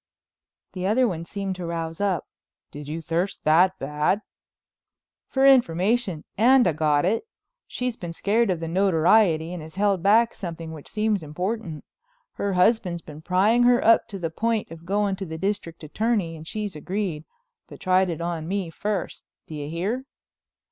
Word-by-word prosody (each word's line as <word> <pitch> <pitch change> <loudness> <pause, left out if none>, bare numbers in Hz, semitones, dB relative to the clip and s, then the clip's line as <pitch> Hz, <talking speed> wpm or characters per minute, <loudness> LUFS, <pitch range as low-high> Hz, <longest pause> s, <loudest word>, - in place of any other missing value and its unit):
The 185 -1 -2
other 245 +5 +3
one 170 -5 -4
seemed 195 0 -4
to 180 - -5
rouse 165 +1 -4
up. 195 -4 0 0.5
"Did 145 0 -9
you 160 +2 -5
thirst 170 +5 -2
that 175 +5 +4
bad?" 150 +9 0 1.0
"For 270 0 +2
information—and 235 - +3
I 170 - +2
got 150 0 +2
it. 225 - 0 0.4
She's 250 -2 -3
been 175 -2 -6
scared 210 +6 +1
of 175 -3 -1
the 165 - -3
notoriety 170 -1 +3
and 175 - -6
has 160 +2 -11
held 200 -2 +1
back 225 +5 +4
something 165 -3 -7
which 155 -3 -10
seems 215 -2 0
important. 170 +2 -4 0.5
Her 200 -1 -2
husband's 180 -2 +2
been 150 0 -11
prying 195 +8 +3
her 245 0 +4
up 230 +1 +5
to 205 - -7
the 165 -3 -3
point 225 +1 -1
of 165 0 -11
going 200 0 0
to 195 - -5
the 160 0 -6
District 190 -3 -3
Attorney 200 +1 -1
and 160 0 -11
she's 210 -2 -4
agreed, 180 -1 -3 0.4
but - - -12
tried 185 0 +2
it 170 -1 -4
on 170 -2 -3
me 190 -2 -2
first. 205 +2 -3 0.2
Do - - -10
you 145 -1 -5
hear?" 200 +11 -2
185 Hz, 170 wpm, -24 LUFS, 165-210 Hz, 1.0 s, up